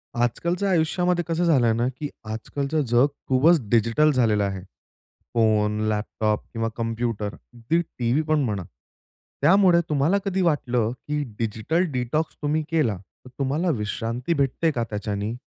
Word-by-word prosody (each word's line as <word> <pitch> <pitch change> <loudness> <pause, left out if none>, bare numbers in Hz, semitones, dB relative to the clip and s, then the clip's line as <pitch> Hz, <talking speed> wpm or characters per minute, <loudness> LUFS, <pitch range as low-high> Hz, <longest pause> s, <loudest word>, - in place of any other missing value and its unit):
आजकालच्या 170 - 0
आयुष्यामध्ये 175 +1 +1
कसं 165 +1 0
झालंय 130 -9 +4
ना 120 +2 0
की 145 - -3 0.2
आजकालचं 140 +7 -2
जग 120 +4 +4 0.2
खूपच 155 +6 +4
डिजिटल 115 +7 +3
झालेलं 110 -6 +2
आहे. 95 -1 -3 0.7
फोन, 105 -2 +2
लॅपटॉप 105 0 -1
किंवा 115 -1 -1
कॉम्प्युटर 115 -3 -2
अगदी 120 +8 -2
टीव्ही 125 -3 -1
पण 155 0 +2
म्हणा. 105 -6 -2 0.8
त्यामुळे 175 +2 +5
तुम्हाला 150 +6 +2
कधी 190 -1 0
वाटलं 125 -9 +1 0.2
की 150 0 -1 0.2
डिजिटल 115 - 0
डिटॉक्स 130 +5 -1
तुम्ही 155 +1 0
केला 140 - +1
तर 95 +7 -18
तुम्हाला 145 +6 0
विश्रांती 115 +7 -2
भेटते 145 +2 +1
का 120 -5 -1
त्याच्यानी? 105 +1 -3
125 Hz, 135 wpm, -24 LUFS, 115-160 Hz, 0.8 s, त्यामुळे